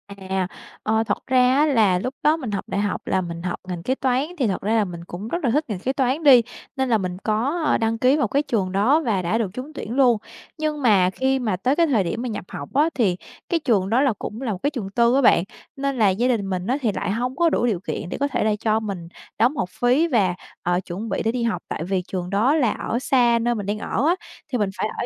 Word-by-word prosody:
À. 190 -1 -2 0.4
Ờ, 220 +1 +2
thật 210 -2 -3
ra 255 0 +4
á 295 +2 +4
là 220 -11 +3
lúc 255 +7 -3
đó 305 +2 +4
mình 255 -9 -5
học 200 - -2
đại 200 - -1
học 205 0 -2
là 190 - +1
mình 170 -1 -6
học 180 -1 -3
ngành 175 -2 -5
kế 260 +7 0
toán, 260 0 +1
thì 260 -6 +1
thật 190 - -2
ra 215 +3 0
là 220 -2 +3
mình 170 -2 -8
cũng 180 +5 -7
rất 345 +8 -3
là 255 - +2
thích 300 +5 +1
ngành 205 -4 -3
kế 255 +7 -1
toán 270 +3 0
đi, 265 -5 +8 0.3
nên 265 -2 0
là 225 - +4
mình 180 -3 -4
có 270 +10 0
đăng 225 0 +1
ký 255 +5 +3
vào 280 -6 +1
cái 275 +7 +1
trường 205 -10 -1
đó 230 +12 +3
và 205 -6 +1
đã 180 +5 0
được 225 -4 -1
trúng 260 +6 -7
tuyển 240 -5 -5
luôn. 250 -4 +4 0.4
Nhưng 305 -1 -2
mà 200 -7 +4
khi 265 +7 0
mà 220 -6 0
tới 255 +8 +1
cái 335 +1 +3
thời 235 -9 +2
điểm 185 +6 -3
mà 250 - -3
nhập 205 -4 -5
học 140 - -7
á, 295 +4 +3
thì 200 -8 +1 0.3
cái 340 - +1
trường 210 -10 +1
đó 235 +5 +3
là 275 -4 +3
cũng 220 +4 -6
là 250 -4 -2
một 190 - -4
cái 285 - +3
trường 240 -10 -5
tư 235 +4 +3
á 275 - +4
bạn, 175 -8 +5 0.3
nên 275 -1 -2
là 215 -4 +4
gia 215 +7 +1
đình 220 -6 0
mình 185 0 -3
á 255 +3 +1
thì 230 -5 +1
lại 195 - -2
hông 250 +4 -2
có 335 +3 +3
đủ 245 - +1
điều 215 -7 0
kiện 175 -2 -5
để - - -4
có 285 - +1
thể 270 -3 -1
là 215 - +2
cho 220 0 +1
mình 195 -6 -5 0.3
đóng 245 +6 +3
học 180 - -1
phí 250 - +2
và, 200 - +2 0.3
ờ, 175 0 +1
chuẩn 200 +6 -5
bị - - -1
để 225 - +1
đi 245 0 -2
học, 230 -2 -1
tại - - -4
vì 185 +1 -1
trường 180 -2 -4
đó 220 +9 +2
là 255 -9 +2
ở 235 - -2
xa 245 -3 +3
nơi 240 +1 +1
mình 205 -3 -4
đang 205 +2 -2
ở 235 +6 -1
á, 345 - +4 0.4
thì 250 - +1
mình 205 -4 0
phải - - 0
ở - - -2
230 Hz, 280 wpm, -22 LUFS, 195-265 Hz, 0.4 s, đi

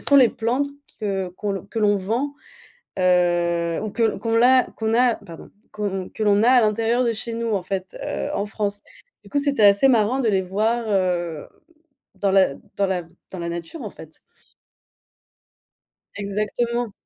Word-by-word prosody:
sont 285 - +3
les 260 -4 +7
plantes 245 +7 -1 0.3
que 195 -3 -2
qu'on 195 +1 -4
que 225 +3 -4
l'on 205 -1 +3
vend, 235 +9 -2 0.6
heu, 175 -2 +2
ou 215 - -3
que 225 +2 0
qu'on 230 -1 -1
l'a 255 +2 +5
qu'on 220 0 -1
a, 245 0 +4
pardon, 165 -5 -12 0.2
qu'on 195 -3 -3
que 220 - -6
l'on 205 0 +4
a 240 - +5
à 255 -1 +6
l'intérieur 225 +3 +1
de 235 - +2
chez 230 +2 -5
nous 230 0 -2
en 195 - -1
fait, 185 0 -5
heu, - - -3
en 200 - -1
France. 205 -1 -3 0.4
Du - - -16
coup, 290 - 0
c'était 280 -6 +2
assez 200 +6 +6
marrant 245 +1 +3
de 235 - +1
les 195 -2 +2
voir, 220 +6 0
heu, 175 -5 0 0.7
dans 200 -1 0
la 190 -7 +4 0.2
dans 200 - +1
la 185 -2 -1 0.3
dans 185 - -7
la 170 - -4
nature 170 - -6
en 215 - -5
fait. 160 -4 -14 2.0
Exactement! 215 +3 -2
205 Hz, 170 wpm, -22 LUFS, 190-235 Hz, 2.0 s, les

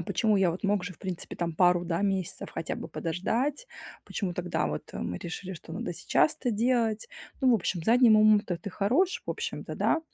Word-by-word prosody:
А - - -2
почему, 200 +4 +1
я 190 -3 +3
вот 175 +5 -6
мог 200 -2 +1
же, 180 - -5
в - - -25
принципе, 185 -3 -6
там 170 -2 -2
пару 175 +1 +4
да, 170 +2 -1
месяцев 195 -3 -2
хотя 165 - -4
бы - - -7
подождать? 235 - -2 0.4
Почему 185 -4 -3
тогда 175 0 -1
вот 75 - -5
мы 90 - -3
решили, 180 +2 -6
что 165 -1 -11
надо 175 0 -3
сейчас 155 - +2
это 245 - 0
делать? 230 -1 +1 0.3
Ну, 260 - +4
в - - +6
общем, 180 -4 -1
задним 235 0 +6
умом-то 215 -4 +4
ты 200 +4 -7
хорош, 300 - +1
в - - -2
общем-то, - - -4
да, 325 - +2
195 Hz, 205 wpm, -28 LUFS, 175-225 Hz, 0.4 s, в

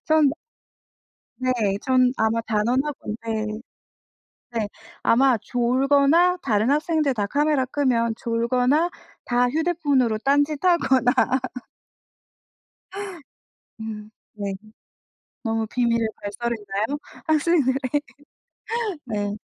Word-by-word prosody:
전 310 -3 +4 1.1
네. 255 0 +2 0.3
전 255 -1 +3
아마 220 +1 +1
단언하건데 225 -2 -2 0.9
네. 225 -3 -1 0.3
아마 255 0 +4
졸거나 280 - +3
다른 220 +3 +1
학생들 305 -2 +1
다 205 -3 -1
카메라 290 +3 +1
끄면 250 -4 +1
졸거나 250 +8 +1 0.3
다 245 0 +2
휴대폰으로 290 -7 +1
딴짓하거나. 280 -1 +2 2.7
으 215 -1 -7 0.2
네. 200 -2 -4 0.9
너무 225 -1 -1
비밀을 230 -1 +1
발설했나요, 215 +3 -3 0.3
학생들의? 310 -4 +2 1.3
네. 205 -3 -2
250 Hz, 180 characters per minute, -23 LUFS, 225-285 Hz, 2.7 s, 전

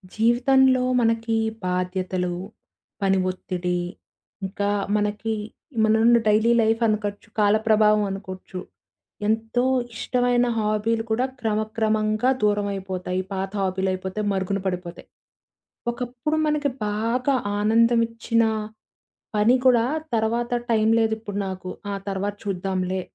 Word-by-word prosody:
జీవితంలో 255 +3 +4 0.2
మనకి 230 0 +1 0.3
బాధ్యతలు, 180 0 -1 0.7
పని 195 -1 +3
ఒత్తిడి, 180 -1 -2 0.7
ఇంకా 200 +1 -2 0.3
మనకి 210 +1 -1 0.5
మనమున్న 220 +2 +5
డైలీ 215 +2 +4
లైఫ్ 225 +1 +2
అనుకోచ్చు, 205 -2 -2
కాల 205 0 +4
ప్రభావం 215 -1 +4
అనుకోవచ్చు 190 -1 -7 0.7
ఎంతో 225 +2 0 0.3
ఇష్టమైన 245 0 +1
హాబీలు 220 +1 0
కూడా 245 +4 +2
క్రమక్రమంగా 215 +1 0
దూరమైపోతాయి. 195 -3 -1
పాత 190 0 -3
హాబీలు 190 0 0
అయిపోతయి, 190 +3 -4
మరుగున 195 +1 -1
పడిపోతాయి. 180 -2 -4 0.8
ఒకప్పుడు 245 +5 -3
మనకి 300 -1 +1 0.2
బాగా 230 +6 0 0.3
ఆనందం 230 +3 +4
ఇచ్చిన 230 0 0 0.9
పని 215 +4 +4
కూడా 240 -3 +5 0.3
తర్వాత 230 +2 0 0.2
టైం 220 -1 +3
లేదు 220 -1 +2
ఇప్పుడు 205 -2 -6
నాకు, 185 -1 -6 0.2
ఆ! - - -2 0.2
తర్వాత 200 +1 -2
చూద్దాంలే, 185 -1 -2
215 Hz, 105 wpm, -24 LUFS, 190-230 Hz, 0.9 s, మనమున్న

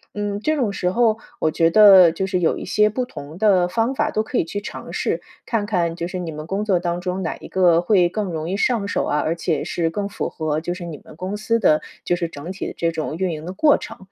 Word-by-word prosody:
嗯， 205 -1 -2
这 310 +4 +1
种 240 -8 0
时 180 -2 -1
候 225 0 +2 0.2
我 160 - +2
觉 165 +1 +2
得， 195 -5 +8
就 190 +4 -2
是 190 -1 0
有 165 - +2
一 - - -6
些 210 0 +3
不 250 +4 -2
同 150 - -10
的 190 -5 +4
方 225 +8 0
法 - - 0
都 215 - 0
可 - - -3
以 - - +2
去 205 +4 -5
尝 - - -8
试， - - -1 0.2
看 220 -3 -1
看 175 -5 0
就 170 0 -4
是 185 0 -5
你 170 -3 -4
们 155 0 -7
工 195 +4 -2
作 195 -4 +2
当 175 0 -2
中 185 +1 -3
哪 160 - -2
一 - - -11
个 175 -3 +3
会 180 -2 +3
更 210 +3 -2
容 160 -1 -4
易 195 - -1
上 215 -3 +1
手 - - -1
啊， 150 - 0
而 160 +3 0
且 165 -2 -1
是 165 -2 -1
更 200 +4 -3
符 - - -3
合 155 -1 -2
就 175 +2 -3
是 180 -2 -7
你 160 -4 -7
们 - - -14
公 185 +4 -4
司 230 +2 0
的 155 -7 +3 0.2
就 175 - +2
是 170 -1 -2
整 160 +4 -7
体 190 - -5
的 - - -6
这 165 0 0
种 155 -1 -4
运 185 -2 0
营 155 -1 -6
的 180 - -5
过 295 +9 +4
程。 - - -9
180 Hz, 295 characters per minute, -21 LUFS, 165-205 Hz, 0.2 s, 得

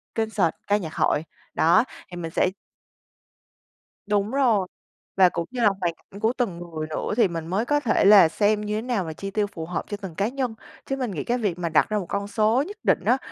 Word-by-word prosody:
concert 220 -6 +1 0.2
ca 205 - +3
nhạc 165 -6 -6
hội. 150 - +1 0.3
Đó, 170 +7 +4 0.3
thì 175 - -7
mình 165 -2 -5
sẽ 180 - +2 1.6
Đúng 205 0 +1
rồi, 235 -8 +2 0.5
và 185 -2 +7
cũng 170 -1 -3
như 250 -1 -3
là 215 - +6
hoàn 170 -2 0
cảnh 200 - -14
của 225 +3 +1
từng 215 -9 -1
người 165 -3 -6
nữa 155 - -3
thì 230 -4 +5
mình 165 -2 -5
mới 195 +6 0
có 290 +3 +2
thể 240 -8 +2
là 200 -5 +8
xem 210 +4 +1
như 210 0 -2
thế 215 - -1
nào 235 -5 -1
mà 160 - -5
chi 195 +5 -6
tiêu 205 0 0
phù 165 -5 -7
hợp 170 0 -3
cho 205 - -4
từng 190 -5 -8
cá 200 +4 0
nhân. 250 -2 -3 0.3
Chứ 270 - -2
mình 255 -5 -3
nghĩ 155 -7 -4
cái 245 - 0
việc 200 -7 -2
mà 170 -1 -1
đặt 155 - +3
ra 215 - 0
một 190 - -5
con 200 0 -2
số 220 +4 +2
nhất 410 +2 -9
định - - +2
á 250 - +4
205 Hz, 240 wpm, -24 LUFS, 175-225 Hz, 1.6 s, là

